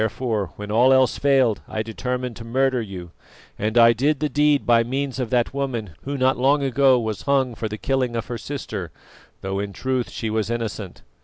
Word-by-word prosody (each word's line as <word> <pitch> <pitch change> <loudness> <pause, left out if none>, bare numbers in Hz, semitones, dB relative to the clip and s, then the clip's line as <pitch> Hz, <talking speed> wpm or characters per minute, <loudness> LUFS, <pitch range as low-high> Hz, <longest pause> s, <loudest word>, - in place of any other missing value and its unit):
Therefore, 110 -3 -1
when 105 0 -7
all 120 +4 +5
else 130 -3 +3
failed, 135 -6 +3
I 110 - -3
determined 125 +2 -4
to 115 - -8
murder 130 +2 +1
you, 90 -5 -8 0.5
and 110 +3 -1
I 115 0 +7
did 140 +5 +1
the 150 - 0
deed 145 -1 +2
by 115 -1 +4
means 135 +2 -3
of 125 -3 -2
that 120 0 +1
woman 125 -8 -3
who 140 +1 -3
not 130 0 +2
long 140 +3 +3
ago 135 -1 +4
was 110 -3 -3
hung 135 -3 +2
for 110 0 -4
the 105 - -5
killing 130 -1 -1
of 115 - -2
her 120 - -5
sister, 105 - -5 0.5
though 95 0 -3
in 100 0 -4
truth 130 +4 -2
she 110 -2 -4
was 110 -1 -1
innocent." 110 -5 -4
120 Hz, 205 wpm, -22 LUFS, 110-135 Hz, 0.5 s, I